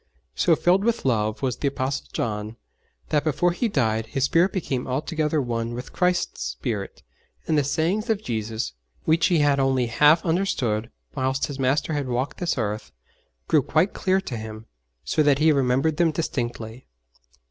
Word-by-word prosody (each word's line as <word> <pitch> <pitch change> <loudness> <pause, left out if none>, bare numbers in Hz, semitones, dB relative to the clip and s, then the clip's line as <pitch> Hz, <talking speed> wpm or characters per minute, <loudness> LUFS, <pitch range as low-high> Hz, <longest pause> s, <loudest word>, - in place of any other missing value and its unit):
So 170 - +3
filled 180 +5 +3
with 235 -5 0
love 110 -2 0
was 125 -2 0
the 145 - -1
Apostle 135 0 -2
John 105 0 -3 0.5
that 150 -1 +2
before 160 +3 +2
he 205 +7 0
died 115 - 0
his 135 +3 -2
spirit 170 +7 +3
became 135 -9 -2
altogether 155 +3 -1
one 120 -2 -2
with 125 +1 -7
Christ's 180 -1 0
spirit, 105 -6 -4 0.4
and 160 - +2
the 145 - +3
sayings 170 - 0
of 215 -1 0
Jesus, 110 - -3 0.3
which 160 +1 +3
he 175 -3 +3
had 145 -1 +3
only 135 -2 +2
half 150 +9 +4
understood 135 - 0 0.2
whilst 130 +1 0
his 140 -2 -7
Master 135 +4 +1
had 145 -3 -1
walked 125 +2 -2
this 175 -4 -1
earth, 105 - -3 0.6
grew 155 - +4
quite 160 +8 +1
clear 190 0 +1
to 125 -10 -5
him, 110 0 -8 0.4
so - - +1
that 145 -2 +4
he 155 +2 +4
remembered 135 +2 +2
them 170 -1 +4
distinctly. 120 -6 -4
140 Hz, 170 wpm, -24 LUFS, 120-160 Hz, 0.6 s, half